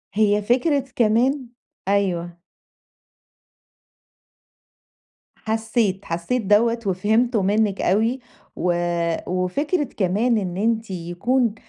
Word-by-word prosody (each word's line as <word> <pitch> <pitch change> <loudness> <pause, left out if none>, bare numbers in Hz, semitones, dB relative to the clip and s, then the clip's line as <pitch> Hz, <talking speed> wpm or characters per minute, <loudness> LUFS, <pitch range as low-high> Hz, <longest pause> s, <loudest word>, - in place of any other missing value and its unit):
هي 210 -1 +3
فكرة 260 +6 +1
كمان 245 +4 +2 0.4
أيوَه. 175 -4 0 3.0
حسيت، 220 -3 -1
حسيت 170 +10 -2
دوّة 230 +4 +3
وفهمته 215 +5 +1
منِك 205 +1 +1
أوي 225 +7 +1 0.4
و 175 +1 0 0.5
وفكرة 280 - 0
كمان 220 0 0
إن 180 -3 -3
أنتِ 225 0 0
يكون 195 +7 -1
215 Hz, 80 wpm, -22 LUFS, 190-240 Hz, 3.0 s, هي